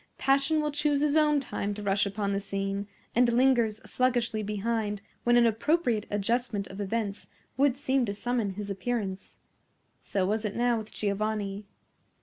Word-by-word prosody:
Passion 275 +3 +2
will 300 0 -1
choose 290 -1 +1
his 300 0 +2
own 300 -2 +4
time 205 -6 -3
to 210 - -7
rush 200 0 +2
upon 200 0 -2
the 200 - 0
scene, 195 0 -3 0.3
and 240 0 +4
lingers 235 -3 +3
sluggishly 245 -3 0
behind 210 0 -2 0.2
when 240 0 +4
an 240 - +6
appropriate 230 -1 +1
adjustment 210 0 0
of 195 +2 -6
events 205 0 -3 0.3
would 275 -1 +3
seem 270 -1 +1
to 200 - -2
summon 225 -3 -1
his 205 0 -5
appearance. 195 -2 -3 0.6
So 195 -2 -1
was 210 +3 0
it 210 -2 -3
now 240 -1 +2
with 215 0 -9
Giovanni. 205 -1 -2
220 Hz, 160 wpm, -28 LUFS, 200-250 Hz, 0.6 s, an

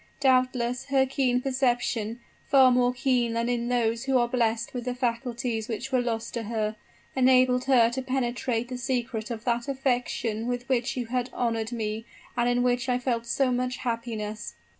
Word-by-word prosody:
Doubtless, 255 -2 +2
her 270 -1 +3
keen 255 -2 +1
perception 245 -4 0 0.3
far 265 -2 +6
more 245 0 +3
keen 250 -2 +1
than 230 +1 0
in 240 -1 -1
those 235 -1 0
who 270 -1 +3
are 240 -1 +3
blessed 235 -2 0
with 245 -2 -4
the 250 -1 -2
faculties 235 -2 -2
which 240 +3 -4
were 255 -1 +3
lost 230 -1 -3
to 235 - -2
her 215 -1 -2 0.4
enabled 255 -1 +4
her 250 -4 +5
to 265 +2 -2
penetrate 245 -2 -1
the 250 -1 -5
secret 240 -3 -2
of 230 -2 -5
that 240 +1 0
affection 245 -4 -1
with 245 0 -3
which 255 -1 0
you 245 - -1
had 250 +1 -2
honored 230 -1 -1
me, 220 -1 -3 0.3
and 240 0 +2
in 245 0 +2
which 250 +1 +1
I 250 - +3
felt 240 -2 -2
so 260 +2 +1
much 250 +1 -1
happiness." 220 - -4
245 Hz, 180 wpm, -27 LUFS, 230-255 Hz, 0.4 s, far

